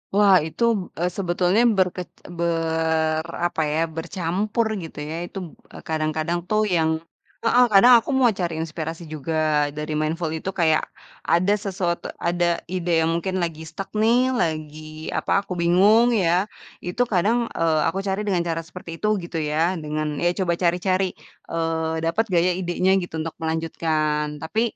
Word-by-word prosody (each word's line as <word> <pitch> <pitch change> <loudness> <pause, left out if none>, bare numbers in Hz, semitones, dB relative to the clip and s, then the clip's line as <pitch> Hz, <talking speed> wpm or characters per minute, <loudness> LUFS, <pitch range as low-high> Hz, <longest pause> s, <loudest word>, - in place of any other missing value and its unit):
Wah, 200 -2 +6
itu 160 - -4 0.2
b - - -4 0.2
eee, 175 - +1
sebetulnya 180 +2 +2 0.2
berkec 180 -1 0 0.3
ber 160 -1 0 0.2
apa 170 - -3
ya, 155 - 0 0.2
bercampur 185 +6 -1 0.2
gitu 160 - -9
ya. 150 +2 -5
Itu 185 - -10
b - - -13 0.4
kadang-kadang 155 +2 -1
tuh 215 0 +2
yang 160 -1 +2 0.5
heeh, 245 +2 +5
kadang 240 +6 +8
aku 230 - -9
mau 255 - +5
cari 175 -2 -1
inspirasi 160 +1 -5
juga 155 +2 -3 0.4
dari 150 0 -3
mindful 160 +2 -1
itu 160 +4 -4
kayak 160 -2 +3 0.5
ada 180 +4 +4
sesuatu 190 -4 -2 0.2
ada 175 0 +1 0.3
ide 180 -1 -1
yang 160 - +2
mungkin 185 +2 -2
lagi 160 -2 -4
stuck 190 +4 -7
nih, 240 +4 +3
lagi, 155 -3 -3
apa, - - -2 0.2
aku - - -3
bingung 205 +8 +5
ya. 175 +2 +3 0.4
Itu 180 +7 -2
kadang, 205 +6 +3 0.2
eee, 165 -2 +2
aku 165 +4 -1
cari 190 +1 0
dengan 180 -4 +1
cara 165 0 -1
seperti 180 -1 -9
itu 210 - -1 0.2
gitu 170 -1 -5
ya, 160 +4 0
dengan 155 0 -3
ya 175 - +2
coba 170 -2 +1
cari-cari, 185 +1 +1 0.3
eee, 160 -1 -2
dapat 165 +7 +1
nggak 175 -4 +2
ya - - +3
idenya 180 +1 +1
gitu 175 -3 -6
untuk 165 0 -5
melanjutkan 160 -1 0 0.2
tapi, 215 +8 -1
170 Hz, 160 wpm, -23 LUFS, 160-190 Hz, 0.5 s, kadang